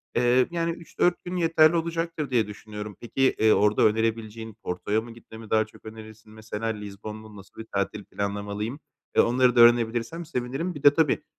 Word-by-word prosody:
Eee, 125 +1 +3
yani, 170 -1 -1
3-4 170 +1 -1
gün 180 +1 -5
yeterli 165 -1 +4
olacaktır 165 -2 -2
diye 120 -5 +1
düşünüyorum. 105 0 -8
Peki, 130 +3 +1
eee, 110 0 +5
orada 105 +1 +3
önerebileceğin 110 0 -1
Porto’ya 105 +5 -1
mı 115 +1 -10
gitme 115 -1 -13
mi 110 -1 -11
daha 110 0 +3
çok 110 - -20
önerirsin? 110 0 -12
Mesela 110 0 -5
Lizbon 105 -1 -6
mu, 110 -1 -12
nasıl 100 +3 -12
bir 110 - -11
tatil 100 +1 -2
planlamalıyım? 100 +6 -4 0.4
Eee, - - +7
onları 125 +1 +3
da 120 - +6
öğrenebilirsem 120 +7 +3
sevinirim. 140 +4 -3
Bir 145 - -9
de 145 -1 +8
tabii, 160 -2 +1
115 Hz, 180 wpm, -26 LUFS, 105-140 Hz, 0.4 s, de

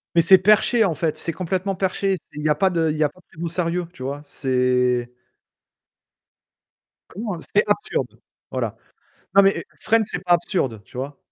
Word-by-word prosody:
Mais 170 - +6
c'est 190 +3 +8
perché 215 +4 +4
en 180 -5 +1
fait, 155 0 -1
c'est 165 - -1
complètement 185 +3 -2
perché, 190 +1 0 0.2
c'est 150 - -9
il - - -4
y - - +2
a 150 - +4
pas 190 +5 +2
de 165 -2 +1
il - - -4
y 155 - 0
a 150 - +4
pas 165 - -21
de - - -33
prise 165 - -11
au 170 - -1
sérieux 170 +1 -1
tu 130 - -9
vois, 140 +2 -4
c'est 125 -2 0 2.0
Comment, 205 +1 -4
heu - - -9
c'est 210 - +5
absurde, 210 - -1 0.3
voilà. - - -3 0.6
Non 200 - +9
mais 195 - +6
et - - -5 0.2
Friends, 225 0 +3
c'est 200 - -3
pas 175 - +2
absurde, 165 - 0
tu - - -16
vois? 135 +2 -5
170 Hz, 205 wpm, -22 LUFS, 145-190 Hz, 2.0 s, Non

